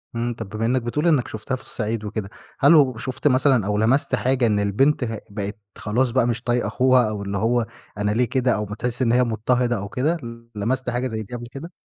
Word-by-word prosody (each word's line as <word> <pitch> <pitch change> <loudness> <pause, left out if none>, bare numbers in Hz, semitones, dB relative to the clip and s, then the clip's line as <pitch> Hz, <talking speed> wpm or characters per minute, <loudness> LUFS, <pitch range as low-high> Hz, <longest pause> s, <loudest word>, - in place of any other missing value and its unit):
إمم، 120 +1 -1
طَب 110 -3 -7
بما 110 +2 -2
إنّك 125 +2 +1
بتقول 145 +8 -1
إنّك 150 -7 +3
شُفتها 110 +5 -4
في 130 - -9
الصعيد 110 -1 -3
وكده، 105 -1 -4 0.3
هل 145 +5 +6
وشُفت 130 -2 +2
مثلًا 130 -4 +3
أو 105 0 0
لمَسْت 115 +7 +2
حاجة 130 -1 +1
إن 105 -2 +2
البنت 125 +9 +2
ه 110 -2 -3
بقت 100 0 -5 0.2
خلاص 120 +5 0
بقى، 125 -1 +2
مش 120 +1 -2
طايقة 120 -2 0
أخوها 125 +2 +3
أو 105 -1 -4
اللي 100 0 -3
هو 115 +3 +1 0.3
أنا 105 0 0
ليه 120 +4 +2
كده 125 +1 +1
أو 105 - -2
ما 105 +1 -6
تحِس 120 +2 -2
إن 120 -3 +3
هي 125 +1 +4
مضطهدة 120 +1 0
أو 100 0 -5
كده، 150 +10 0 0.4
لمَسْت 125 +5 -1
حاجة 125 +1 -1
زي 110 -3 -4
دي 105 - -12
قبل 120 0 -7
كده؟ 160 +6 -8
120 Hz, 230 wpm, -23 LUFS, 110-130 Hz, 0.4 s, هل